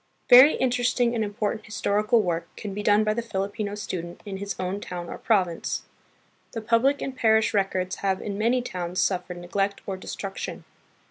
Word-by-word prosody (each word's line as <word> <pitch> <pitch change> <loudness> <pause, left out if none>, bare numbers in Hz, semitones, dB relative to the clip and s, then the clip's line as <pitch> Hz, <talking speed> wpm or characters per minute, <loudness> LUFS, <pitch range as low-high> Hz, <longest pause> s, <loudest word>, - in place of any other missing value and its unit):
Very 260 +5 +9
interesting 245 -1 +1
and 225 -2 0
important 210 +1 -2
historical 215 +1 +1
work 170 -2 -2
can 205 -3 -6
be 205 - -4
done 210 0 +4
by 215 0 +1
the 235 - -2
Filipino 205 -1 -3
student 175 -4 -5
in 195 -2 -5
his 200 +1 -4
own 185 +2 -2
town 175 -3 -6
or - - -7
province. 185 -7 0 0.7
The 225 - -4
public 235 +6 +2
and 270 - -4
parish 220 -2 +3
records 190 -2 0
have 190 -1 0
in 200 - -4
many 235 +4 +1
towns 180 -4 -4
suf 180 -2 +1
fered 180 - -6
neglect 195 +3 -2
or 190 -1 -4
destruction. 195 +1 -6
205 Hz, 180 wpm, -25 LUFS, 190-225 Hz, 0.7 s, Very